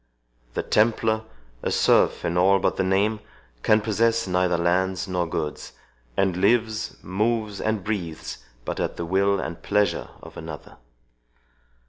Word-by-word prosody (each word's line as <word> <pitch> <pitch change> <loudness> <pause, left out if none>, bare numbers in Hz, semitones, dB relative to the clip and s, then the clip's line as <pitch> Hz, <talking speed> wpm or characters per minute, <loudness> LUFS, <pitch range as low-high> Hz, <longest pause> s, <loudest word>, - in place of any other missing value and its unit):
The - - -1
Templar, 110 0 +2 0.4
a - - -1
serf - - +3
in 85 - -1
all 95 +2 +5
but 95 - 0
the 95 - 0
name, 100 +3 +2 0.4
can 110 - +4
possess 115 +2 +1
neither 90 -1 +2
lands 90 +2 +1
nor 90 -2 -1
goods, 75 -2 -4 0.4
and 95 -2 +2
lives, 110 +2 +1
moves, 105 +2 -1
and 110 -3 -1
breathes, 90 -7 -4 0.3
but - - -3
at - - -2
the 85 - -3
will 100 +3 +2
and 85 -2 -5
pleasure 105 0 +1
of - - -11
another." - - -9
100 Hz, 140 wpm, -24 LUFS, 90-110 Hz, 0.4 s, all